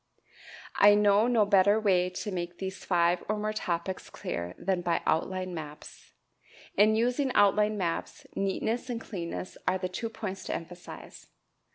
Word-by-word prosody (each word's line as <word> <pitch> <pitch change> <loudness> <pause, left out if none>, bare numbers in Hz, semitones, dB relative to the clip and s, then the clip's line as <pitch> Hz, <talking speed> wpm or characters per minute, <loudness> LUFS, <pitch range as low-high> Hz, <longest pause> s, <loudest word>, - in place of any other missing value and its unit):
I 205 0 +8
know 205 +2 +4
no 230 -4 +4
better 200 +1 +4
way 185 -4 +2
to 195 +3 -5
make 175 -1 -4
these 190 0 -6
five 175 -1 +2
or 215 - +1
more 215 0 -2
topics 180 -2 -3
clear 85 +1 -5
than 190 -2 -1
by 175 -1 0
outline 185 +2 0
maps. 150 -2 -9 0.6
In 215 +2 +5
using 250 +4 +1
outline 210 +1 +4
maps, 170 -4 -3
neatness 220 +6 -1
and 235 -2 -2
clearness 180 -4 -6
are 185 - +3
the 185 -1 -3
two 225 +5 -4
points 195 -4 -6
to - - -2
emphasize. 175 +1 -9
190 Hz, 155 wpm, -29 LUFS, 175-215 Hz, 0.6 s, I